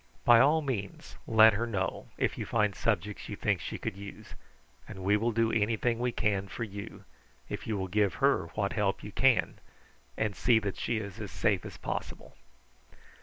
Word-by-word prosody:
By 120 -1 +8
all 150 +5 +4
means 110 -9 -5
let 110 0 +7
her 115 +3 -1
know 95 -5 -3
if - - 0
you - - -4
find 105 -3 +1
subjects 105 -2 -2
you - - -4
think - - 0
she - - -5
could - - -4
use, 100 0 -10 0.5
and 95 - -8
we 100 +2 +3
will 115 +3 +1
do 115 0 +1
anything 115 +2 +1
we 125 0 0
can 100 -4 0
for 95 +5 -5
you, 100 -2 -8 0.5
if - - -5
you 110 -2 -1
will 95 -1 -2
give 100 +1 +1
her 135 -11 +2
what 100 -2 -1
help 105 -3 0
you 105 - -7
can 130 +2 +2 0.6
and 105 -2 -1
see 120 -2 +4
that 105 -3 -2
she 120 - -1
is 105 0 -6
as 105 - -5
safe 105 -1 0
as - - -10
possible." - - -6
105 Hz, 190 wpm, -30 LUFS, 100-115 Hz, 0.6 s, By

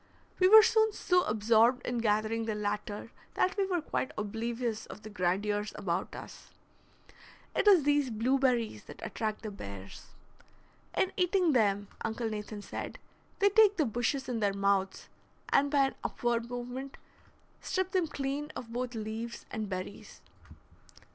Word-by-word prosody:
We 370 - +6
were 435 +2 +10
soon 440 -1 +3
so 360 -2 +2
absorbed 225 +3 +3
in 245 -1 -1
gathering 220 +1 +1
the 220 -1 -2
latter 210 +1 -3 0.2
that 370 - +2
we 395 -2 +1
were 355 -4 -1
quite 280 - -2
oblivious 225 +2 -3
of 210 - -10
the 215 - -9
grandeurs 205 +3 0
about 175 0 -2
us. - - -10 1.1
It - - +1
is 375 -7 +7
these 290 -2 +2
blueberries 240 - +1
that - - -11
attract 215 -1 -3
the 215 - -4
bears. 100 - -9 0.9
In 375 - +2
eating 360 -1 +3
them, 205 -4 +2 0.2
Uncle 225 +1 -2
Nathan 210 -1 -6
said, - - -6 0.4
they 400 - +4
take 410 -1 +5
the 310 - +3
bushes 245 +4 -1
in 245 -3 -2
their 200 -2 +1
mouths, 195 -1 0 0.5
and 285 +1 +4
by 275 -2 +3
an - - -15
upward 235 -1 -1
movement 245 +2 -6 0.6
strip 375 -1 -1
them 365 -3 +1
clean 285 +1 -3
of 230 -2 -7
both 245 0 -3
leaves 225 +2 -5
and 215 -2 -3
berries. 185 +1 -7
235 Hz, 150 wpm, -31 LUFS, 210-280 Hz, 1.1 s, were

